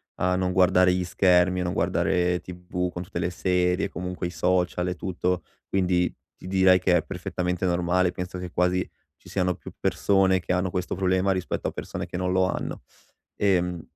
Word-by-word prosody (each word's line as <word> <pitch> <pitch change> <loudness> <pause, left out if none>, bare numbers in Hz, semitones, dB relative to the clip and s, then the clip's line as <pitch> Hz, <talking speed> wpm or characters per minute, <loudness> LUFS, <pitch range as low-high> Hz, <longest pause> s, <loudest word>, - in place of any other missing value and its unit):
a 90 0 +1
non 90 0 0
guardare 90 0 +4
gli 90 0 0
schermi, 90 0 +3
a - - 0
non 90 0 -2
guardare 90 0 +1
tv 90 0 -4
con 90 - -5
tutte 85 - -7
le 85 - 0
serie, 90 +1 +1
comunque 90 0 -5
i - - -1
social 90 +1 0
e 90 - -2
tutto. 90 0 -2 0.2
Quindi 90 -2 +1 0.2
ti - - -11
direi 95 -1 +5
che 90 -1 +3
è 80 - -1
perfettamente 90 +4 -3
normale, 90 +1 +2
penso 90 0 -6
che 90 -1 -5
quasi 90 +1 +1 0.3
ci - - -16
siano 90 -2 0
più - - -11
persone 95 -2 +2
che 90 - -2
hanno 90 +1 0
questo 90 -1 -2
problema 95 +1 +1
rispetto 95 -1 -2
a - - -2
persone - - -5
che - - -5
non 90 0 -1
lo 95 0 +3
hanno. 90 - -3 0.5
Ehm, 90 -3 +1
90 Hz, 190 wpm, -25 LUFS, 90-95 Hz, 0.5 s, direi